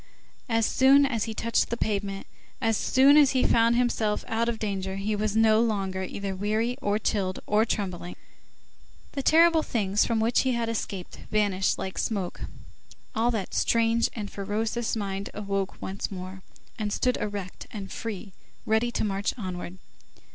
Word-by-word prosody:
As 225 -1 +2
soon 275 +4 +5
as 235 -6 -1
he 225 -1 -5
touched 230 +1 +1
the 235 - -2
pavement, 200 -3 -2 0.3
as 225 -1 +1
soon 270 +6 +5
as 285 -3 +6
he 255 - +2
found 230 0 +4
himself 235 -3 0
out 230 +1 0
of 235 - -2
danger, 195 -3 -3
he 205 +2 -1
was 210 0 -1
no 220 0 +5
longer 195 -5 -1
either 195 +1 -4
weary, 215 +5 0
or 205 0 +1
chilled 195 -3 -1
or 215 +2 +3
trembling; 185 -5 -3 1.0
the 275 - -3
terrible 330 +3 +5
things 210 -7 +1
from 230 -2 0
which 230 +2 +2
he 260 -1 +2
had 235 -1 -1
escaped 200 -5 -5
vanished 200 -3 +1
like 190 - -4
smoke, 195 -5 -2 0.7
all 225 +2 +2
that 220 -5 -3
strange 230 0 +2
and 210 -3 -5
ferocious 220 +4 -2
mind 200 -2 -3
awoke 195 -2 -3
once 195 +1 -4
more, 185 0 -7 0.4
and 210 -1 -2
stood 250 +4 +1
erect 200 -3 -5
and 200 -3 -7
free, 210 -3 -6 0.3
ready 220 +2 +2
to 240 - -2
march 200 -1 -1
onward. 185 -3 -6
215 Hz, 160 wpm, -27 LUFS, 195-230 Hz, 1.0 s, as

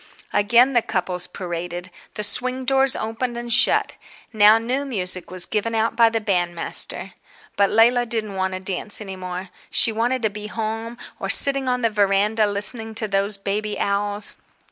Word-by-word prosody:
Again 235 +6 +3
the 240 - +2
couples 180 -3 -3
paraded. 175 0 -7 0.2
The 210 - -4
swing 255 +4 +2
doors 270 0 +2
opened 235 +2 -5
and 240 0 -3
shut. 245 - +1 0.4
Now 215 0 +5
new 250 +5 -3
music 185 -9 -2
was 185 -1 +1
given 225 +1 -3
out 225 +1 -1
by 230 -1 +4
the 225 0 -2
bandmaster. 175 -1 +1 0.4
But 200 -1 +2
Leila 240 +2 +2
didn't 220 -3 -4
want 190 0 -3
to - - -6
dance 190 +2 0
any 195 -3 -8
more. 185 0 -8 0.2
She 230 - +4
wanted 240 +3 -2
to 220 - 0
be 210 +1 -8
home, 225 +2 -6 0.2
or - - -5
sitting 275 -2 +6
on 250 -1 -2
the 230 - +1
veranda 210 +1 +1
listening 220 +2 +1
to 215 0 0
those 200 +1 -1
baby 205 +2 -4
owls. 205 +1 -2
215 Hz, 170 wpm, -20 LUFS, 195-235 Hz, 0.4 s, sitting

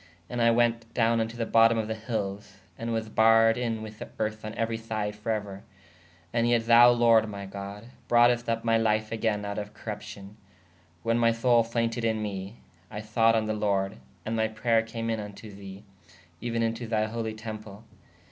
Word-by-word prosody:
And 120 -1 -2
I 115 - +5
wēt 115 -1 +1
downe 115 -1 +3
vn 110 0 0
to 115 - -10
the 115 - -1
botome 115 0 +4
of 110 -1 -1
the 110 - -2
hylles/ 105 -3 -5 0.2
and 115 +4 -4
was 110 -1 -2
barredin 115 +1 +3
with 110 0 -10 0.2
erth 110 0 -2
on 110 0 -5
euery 115 0 -2
syde 110 -2 -3
for 105 +2 -7
euer. 100 -3 -4 0.7
And 120 0 +2
yet 120 -1 +2
thou 120 +1 +8
lorde 115 -2 +4
my 100 -1 -6
God 100 +3 -8 0.2
broughest 120 0 +4
vp 115 0 0
my 115 -1 +3
life 110 -1 +1
agayne 110 -2 -1
out 100 0 -3
of 105 0 -8
corrupcion. 105 -2 -8 0.7
When 115 +1 +1
my 115 -1 +4
soule 115 0 +3
faynted 115 0 -2
in 110 -1 +1
me/ 100 0 -5 0.3
I 105 - -6
thought 115 +2 +2
on 110 -1 +1
the 110 - -1
lorde: 100 -2 -1 0.2
& - - -34
my 110 0 0
prayer 110 +1 +1
came 115 0 -4
in 110 - -1
vn 105 -1 -7
to 110 0 -11
the/ 100 0 -10 0.6
even 115 -1 -1
in 115 0 +1
to 115 0 -7
thy 110 -1 +1
holy 110 0 -4
temple. 110 -1 -8
110 Hz, 195 wpm, -27 LUFS, 105-115 Hz, 0.7 s, thou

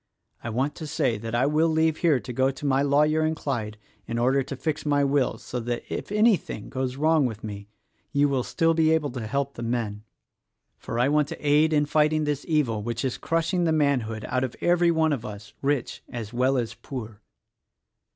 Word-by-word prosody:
I 115 - -3
want 130 +6 -1
to 155 - -6
say 120 -7 0
that 115 +1 -4
I 125 +3 +3
will 155 +3 +3
leave 160 0 +2
here 155 -6 +3
to 125 - -7
go 130 +2 +2
to 135 +2 -6
my 135 -1 +3
lawyer 150 +2 +3
in 160 0 +1
Clyde 115 -8 -3 0.3
in 115 +1 -3
order 130 +3 +3
to 135 +1 -5
fix 150 +4 -3
my 145 -1 +2
will 140 -1 +1
so 125 - -5
that 120 0 -3
if - - -5
anything 210 - +1
goes 130 -1 -3
wrong 155 -1 +3
with 110 -2 -7
me, 100 -1 -7 0.4
you 145 0 +3
will 135 -2 0
still 165 +7 +1
be 160 -1 +3
able 150 -4 0
to 120 -3 -5
help 140 +3 -1
the - - -8
men; 115 -3 -2 0.8
for 115 - -5
I 125 +2 +3
want 150 0 +2
to 145 - -6
aid 150 +2 +4
in 150 -1 +3
fighting 155 +1 +2
this 150 -1 -1
evil 140 -10 +1
which 120 +4 -3
is 130 - -2
crushing 165 +2 0
the 160 - +2
manhood 130 -8 0
out 130 0 0
of 130 - -3
every 175 0 +3
one 160 -2 +2
of 125 -5 -3
us 105 -3 -9
— - - -43
rich 140 -3 -1
as 115 -3 -6
well 130 +2 +2
as 115 -2 -2
poor." 115 -6 -8
140 Hz, 215 wpm, -25 LUFS, 120-155 Hz, 0.8 s, aid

